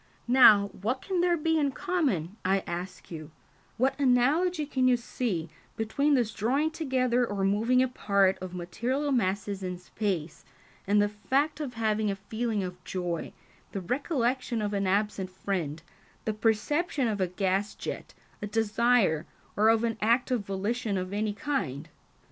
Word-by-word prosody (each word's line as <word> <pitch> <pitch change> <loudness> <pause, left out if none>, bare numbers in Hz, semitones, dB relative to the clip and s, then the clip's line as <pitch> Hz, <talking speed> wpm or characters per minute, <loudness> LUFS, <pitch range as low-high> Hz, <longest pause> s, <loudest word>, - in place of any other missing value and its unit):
Now, 215 -5 +7
what 235 +8 -3
can 370 -3 0
there 350 -1 +3
be 320 +1 +1
in 280 -2 +1
common, 215 - -1
I 190 +1 +1
ask 175 +2 -6
you, 155 -2 -7 0.5
what 260 +3 +2
analogy 290 +6 +3
can 260 -3 +1
you 250 -1 +4
see, 225 -8 -3 0.3
between 280 +7 +2
this 235 -4 +1
drawing 275 +10 +1
together 255 -6 +1
or 205 -4 -2
moving 230 +6 +3
apart 200 -6 +2
of 185 -1 -6
material 245 +11 -2
masses 200 -4 0
in 180 -1 -4
space, 180 -3 -3 0.4
and 205 +1 +4
the 205 - +4
fact 270 +9 0
of 270 -6 -5
having 220 -1 +1
a 200 - -1
feeling 220 +1 -2
of 180 0 -7
joy, 175 -3 -3 0.4
the 195 - -3
recollection 250 - -1
of 210 -1 -2
an 200 -1 0
absent 200 -1 0
friend, 175 -5 -3 0.4
the 220 - 0
perception 250 +7 +1
of 210 -3 -1
a 185 - +2
gas 195 +3 -1
jet, - - -6 0.3
a 210 - -3
desire, 220 -5 +2 0.3
or 215 +2 +4
of 225 0 +3
an 225 -2 -1
act 235 +4 +2
of 240 -5 +1
volition 205 +2 -1
of 185 +1 -4
any 210 0 -1
kind?" 185 - -3
220 Hz, 160 wpm, -28 LUFS, 195-255 Hz, 0.5 s, Now